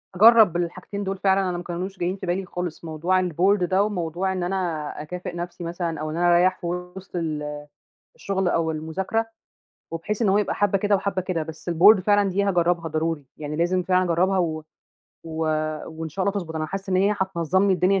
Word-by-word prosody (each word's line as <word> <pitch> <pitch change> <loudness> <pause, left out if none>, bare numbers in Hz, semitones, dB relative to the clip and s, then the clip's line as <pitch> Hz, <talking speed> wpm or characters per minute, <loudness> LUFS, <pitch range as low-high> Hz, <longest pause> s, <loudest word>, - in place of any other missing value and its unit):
أجرّب 215 -3 +7
الحاجتين 180 +4 -4
دول 195 0 -3
فعلًا، 190 -1 +2
أنا 175 - -2
ما 175 - -6
كانوش 180 +2 -5
جايّين 180 +2 -1
في 190 - -7
بالي 185 +2 -1
خالص، 180 -2 -5
موضوع 170 +4 +1
الboard 185 +4 +2
ده 185 +3 +2
وموضوع 185 -2 -2
إن 185 -1 -2
أنا 185 +2 -1 0.4
أكافئ 175 +3 -6
نَفسي 175 0 -6
مثلًا 170 -2 -3
أو 155 0 -3
إن 160 - -4
أنا 175 0 +4
أريّح 185 +1 +3
في - - -6
وِسط 180 +2 -6
ال 150 -3 -3 0.5
الشغل 190 -2 -1
أو 165 -2 +1
المذاكرة 170 +8 -2 0.7
وبحيث 180 +7 -3
إن 215 - +3
هو 195 - +4
يبقى 210 - 0
حبّة 200 -1 +2
كده 205 +1 +2
وحبّة 195 -1 -1
كده، 180 -3 -2
بس 160 +2 -8
الboard 185 +5 +7
فعلًا 205 +1 +3
دي 195 +2 0
هاجرّبها 175 -3 +1
ضروري، 160 -1 -2
يعني 150 0 -5
لازم 175 +3 +1
فعلًا 185 0 +3
أجرّبها 185 +2 +2
و 160 -3 -1 0.6
و 165 - -8 0.5
وإن 160 0 -6
شاء 190 +5 -3
الله 200 - +1
تضبُط، 160 -3 -8
أنا 155 0 -2
حاسّة 195 +3 -5
إن 185 - +2
هي 200 +3 +3
هتنظّم 190 0 +1
لي 195 - +4
الدنيا 185 +2 +2
180 Hz, 205 wpm, -24 LUFS, 165-195 Hz, 0.7 s, أجرّب